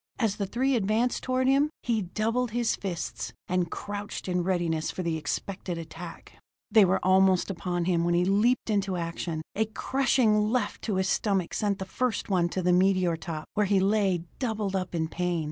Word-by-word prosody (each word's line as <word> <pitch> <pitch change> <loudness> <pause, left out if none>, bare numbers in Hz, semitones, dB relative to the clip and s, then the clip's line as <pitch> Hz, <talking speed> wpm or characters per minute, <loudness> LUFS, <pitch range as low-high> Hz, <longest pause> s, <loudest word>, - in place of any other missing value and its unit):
As 215 -4 0
the 200 - -2
three 260 +7 +1
advanced 225 +3 +1
toward 255 0 0
him, 280 +3 +4
he 230 -3 +1
doubled 225 +6 -1
his 235 +1 0
fists, 180 -4 -4
and 180 -1 0
crouched 205 +2 -5
in 180 -1 +1
readiness 170 -3 0
for 185 - -4
the 165 -1 -1
expected 175 +4 -3
attack. 165 +1 -9 0.3
They 215 -2 +7
were 190 +1 +2
almost 190 0 +4
upon 175 -1 -2
him 170 -2 +2
when 175 0 +2
he 175 +1 +3
leaped 220 +5 +2
into 195 -3 0
action. 165 -1 -3
A 220 - +1
crushing 220 -2 +2
left 250 +2 -1
to 210 - -1
his 190 0 +1
stomach 195 -4 0
sent 205 -2 0
the 190 - -5
first 235 +1 -2
one 175 -2 +2
to 185 +1 -2
the 180 0 +3
meteor 185 -2 +3
top, 160 -1 -6
where 210 -1 +1
he 195 0 +3
lay 195 -3 +2 0.2
doubled 215 -6 -1
up 185 -2 -2
in 160 -1 0
pain. 175 +1 -1
190 Hz, 190 wpm, -27 LUFS, 175-215 Hz, 0.3 s, They